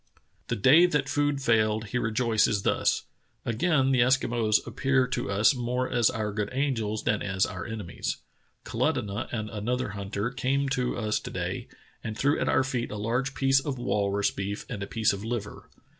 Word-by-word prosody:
The - - -1
day 150 - +6
that 150 -5 0
food 145 0 0
failed 110 -2 +2
he 125 - -1
rejoices 110 -3 +1
thus: - - +1 0.4
"Again 135 +3 +2
the 130 - +3
Eskimos 120 -3 +2
appear 135 -1 +1
to 125 -4 -3
us 100 +6 +4
more 125 0 -1
as 120 -4 +3
our 110 -1 -2
good 105 -1 -2
angels 120 -6 -1
than 105 - +1
as 95 -1 +1
our 90 +4 -6
enemies. 110 -6 -4 0.5
Kalutunah 105 +2 -1
and 110 -3 -3
another 120 +3 -2
hunter 100 +3 -3
came 135 +2 0
to 125 -2 -1
us 110 -2 0
to - - -8
day - - -4 0.4
and 110 -1 -5
threw 145 +2 +2
at - - 0
our 130 - +3
feet 125 -2 -2
a 105 - -5
large 125 +6 -1
piece 135 0 +3
of 135 -1 -4
walrus 100 -4 0
beef 100 +1 -4
and 110 -5 -6
a 100 - -4
piece 110 -2 +1
of 100 +1 -6
liver." 115 -2 -5
115 Hz, 180 wpm, -27 LUFS, 105-130 Hz, 0.5 s, day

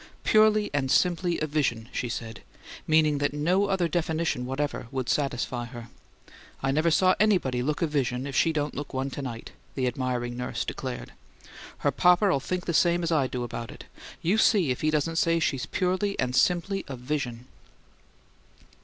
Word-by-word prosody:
"Purely 215 -1 +4
and 135 -2 0
simply 175 +2 +2
a - - +2
vision!" 135 -7 -1
she 125 - -3
said, 115 -2 -6 0.5
meaning 155 -2 +3
that 145 0 0
no 180 +7 +2
other 190 -3 +1
definition 160 -6 -1
whatever 135 -2 -3
would 130 -1 -3
satisfy 125 -2 -1
her. 120 -1 -10 0.7
"I 135 - +2
never 155 +4 +2
saw 185 +3 +4
anybody 180 -13 +2
look 150 +6 -1
a - - +4
vision 135 -4 -1
if 140 - -5
she 165 - +3
don't 150 -2 -2
look 145 -1 -6
one 135 +1 -2
to 140 - -5
night," 120 -4 -6 0.2
the 130 - 0
admiring 125 -1 -2
nurse 125 0 -3
declared. 130 -2 -5 0.6
"Her 145 - +1
papa'll 180 +2 +4
think 180 +6 -3
the 170 - -1
same 175 +1 +3
I 145 -5 +2
do 125 -1 -4
about 120 -1 -5
it. - - -10 0.4
You 195 +7 +2
see 190 - +4
if 125 - -3
he 155 - +2
doesn't 155 +2 0
say 165 0 +3
she's 150 -5 -1
purely 185 +2 -1
and 125 -1 0
simply 180 +6 +2
a 135 - -5
vision." 125 -2 -4
145 Hz, 175 wpm, -27 LUFS, 125-170 Hz, 0.7 s, Purely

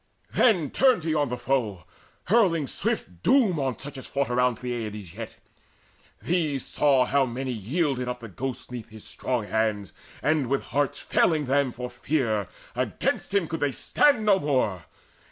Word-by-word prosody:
Then 180 - +3
turned 255 -9 +4
he 160 -1 0
on 145 -3 +1
the 125 - -3
foe, 120 -8 -1 0.4
hurling 180 -7 +3
swift 90 -8 -3
doom 215 - +4
On 130 -4 -1
such 140 +1 -8
as - - -10
fought 140 -2 -1
around 125 -1 +2
Peleides 110 -7 -5
yet. 110 +2 -7 0.9
'These 155 -6 0
saw 135 -3 +3
how 140 +2 +3
many 130 +2 -3
yielded 125 - -1
up 125 0 -3
the 115 - -7
ghost 125 +6 -5
Neath 120 -3 -7
his 110 -1 -12
strong 125 -4 -2
hands, 105 -2 -1 0.3
and, 150 -4 +2
with 135 +2 0
hearts 145 0 -1
failing 155 -3 +2
them 135 0 +2
For 125 +1 -5
fear, 120 - -1 0.3
against - - -1
him 200 -4 +1
could 165 - -4
they 145 -1 +1
stand 245 - +3
no 200 -2 +5
more. 125 - 0
130 Hz, 165 wpm, -26 LUFS, 115-155 Hz, 0.9 s, no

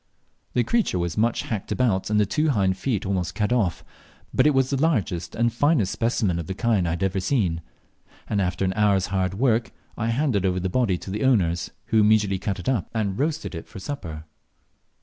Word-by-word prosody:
The 120 - +2
creature 225 - +1
was 85 -1 -2
much 115 +2 +1
hacked 105 -4 -4
about, 110 -8 +1
and 105 0 +2
the 105 - +4
two 150 +10 +1
hind 95 -8 +2
feet 105 0 -2
almost 90 -2 -2
cut 105 +3 +1
off; 100 -9 0 0.5
but - - +4
it 150 - +4
was 130 0 +2
the 135 -1 0
largest 100 - 0
and 120 0 +1
finest 140 - +2
specimen 110 -6 0
of 80 - -5
the 95 - -4
kind 105 -5 +1
I 85 +1 -1
had 95 0 0
seen; 90 -8 0 0.7
and 100 - 0
after 90 +1 -1
an 95 - 0
hour's 100 -2 +2
hard 95 -1 0
work 115 0 +1 0.2
I 115 - -2
handed 115 -4 +1
over 90 -1 +1
the 95 +1 -2
body 105 -4 +1
to 95 - -8
the 105 +2 -2
owners, 90 -10 +2 0.2
who 110 - +2
immediately 105 -2 +3
cut 100 -1 -2
it - - -8
up 125 -7 0
and 105 -1 -1
roasted 155 -2 -1
it 80 - -7
for - - -11
supper. 90 - -6
105 Hz, 210 wpm, -24 LUFS, 95-120 Hz, 0.7 s, the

